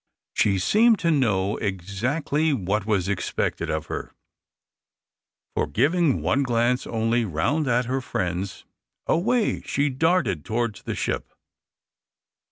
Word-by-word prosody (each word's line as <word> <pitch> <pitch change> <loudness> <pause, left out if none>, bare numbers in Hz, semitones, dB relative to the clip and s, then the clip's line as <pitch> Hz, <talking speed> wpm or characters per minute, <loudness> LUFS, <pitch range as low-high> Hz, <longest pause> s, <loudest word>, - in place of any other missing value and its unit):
She 100 -2 +2
seemed 215 - +4
to 170 - +2
know 105 -9 +1
exactly 120 - -1
what 105 -2 -1
was 100 -4 +1
expected 100 -2 -2
of - - -2
her, - - -6 1.4
for, - - 0
giving 150 +4 +2
one 140 - +2
glance 125 -1 +1
only 115 +1 +1
round 115 - 0
at 125 0 +2
her 130 +2 -1
friends, 95 -4 -3 0.4
away 220 +7 +1
she 145 +1 0
darted 130 - +1
towards 115 -3 -2
the - - -4
ship. - - -3
120 Hz, 120 wpm, -24 LUFS, 100-145 Hz, 1.4 s, seemed